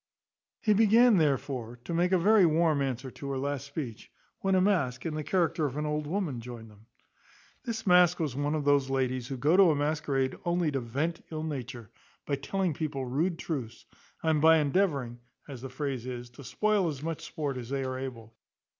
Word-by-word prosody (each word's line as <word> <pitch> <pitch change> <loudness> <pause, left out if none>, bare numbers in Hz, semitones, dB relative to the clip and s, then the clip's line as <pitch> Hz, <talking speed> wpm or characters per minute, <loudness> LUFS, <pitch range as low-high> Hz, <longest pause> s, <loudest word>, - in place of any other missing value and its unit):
He 215 - +3
began 225 +2 +5
therefore 135 -6 -1
to 170 - -5
make 175 +2 +2
a 185 - +5
very 205 +3 +5
warm 160 -3 +3
answer 130 -1 -3
to 140 - -7
her 135 - -2
last 140 +1 -3
speech, 140 -6 -7 0.3
when 195 0 +1
a - - +4
mask, 175 -11 +1
in 165 - -2
the 155 0 -3
character 165 -1 +1
of 135 +1 -6
an 150 - -1
old 150 0 -2
woman, 160 - -2
joined 115 -2 -9
them. 105 +2 -20 0.8
This 225 -2 -4
mask 180 -2 +5
was 150 -6 -2
one 145 +2 -1
of 150 -2 -2
those 140 -2 +3
ladies 130 -2 -1
who 135 - -5
go 150 +7 +3
to 190 -2 +7
a 155 - +3
masquerade 145 -3 0
only 175 -3 +1
to 135 - -1
vent 140 +8 -3
ill 155 -1 -4
nature, 125 -7 -6 0.3
by - - -3
telling 190 +3 -1
people 140 -3 -3
rude 160 +8 0
truths, 125 -10 -5 0.4
and 160 -2 +2
by 160 +1 +7
endeavouring, 140 -6 0 0.3
as 135 -5 -8
the 135 - -6
phrase 130 -2 -4
is, 120 -1 -6
to 135 +3 -12
spoil 205 +7 +1
as 145 -3 -4
much 165 -1 -4
sport 145 -3 -4
as 125 -2 -7
they 135 0 -1
are 130 0 -3
able. 115 -4 -7
145 Hz, 200 wpm, -29 LUFS, 130-170 Hz, 0.8 s, to